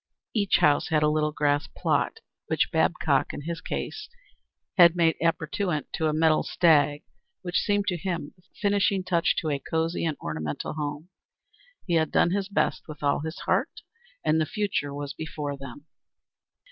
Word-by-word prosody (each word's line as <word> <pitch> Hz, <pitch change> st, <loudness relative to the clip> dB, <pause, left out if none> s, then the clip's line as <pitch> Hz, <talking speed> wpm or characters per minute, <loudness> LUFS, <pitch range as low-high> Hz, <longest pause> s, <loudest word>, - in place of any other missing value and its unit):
Each 205 Hz, -4 st, +3 dB
house 145 Hz, -1 st, +3 dB
had 155 Hz, -1 st, +2 dB
a -, -, +4 dB
little 150 Hz, 0 st, +1 dB
grass 145 Hz, +1 st, +1 dB
plot, -, -, -1 dB, 0.3 s
which -, -, +1 dB
Babcock -, -, +1 dB
in -, -, -6 dB
his 165 Hz, +3 st, -5 dB
case 425 Hz, -, -5 dB, 0.7 s
had 175 Hz, -3 st, +7 dB
made 165 Hz, -2 st, +3 dB
appurtenant 165 Hz, 0 st, -1 dB
to 160 Hz, -, 0 dB
a -, -, +2 dB
metal 155 Hz, 0 st, +3 dB
stag, 150 Hz, -4 st, +3 dB, 0.4 s
which 175 Hz, -1 st, 0 dB
seemed 205 Hz, -1 st, +1 dB
to 180 Hz, -, -1 dB
him 170 Hz, -4 st, -4 dB
the 180 Hz, -, -26 dB, 0.2 s
finishing 200 Hz, -2 st, +2 dB
touch 175 Hz, -2 st, +1 dB
to 155 Hz, -, -2 dB
a 140 Hz, -, -1 dB
cosey 160 Hz, +3 st, -1 dB
and 160 Hz, -3 st, -1 dB
ornamental 80 Hz, -1 st, -4 dB
home. 150 Hz, +2 st, -5 dB, 0.8 s
He 175 Hz, -, -2 dB
had 160 Hz, -2 st, +2 dB
done 170 Hz, -, +3 dB
his 200 Hz, +1 st, -1 dB
best 200 Hz, -, 0 dB
and 155 Hz, -, -7 dB
with 145 Hz, -, -16 dB
all 140 Hz, 0 st, +2 dB
his 160 Hz, +3 st, -6 dB
heart, -, -, 0 dB, 0.4 s
and 155 Hz, +1 st, +3 dB
the 155 Hz, -, 0 dB
future 200 Hz, -9 st, -1 dB
was 145 Hz, 0 st, -5 dB
before 150 Hz, -2 st, -5 dB
them. 140 Hz, +1 st, -10 dB
160 Hz, 170 wpm, -26 LUFS, 145-175 Hz, 0.8 s, had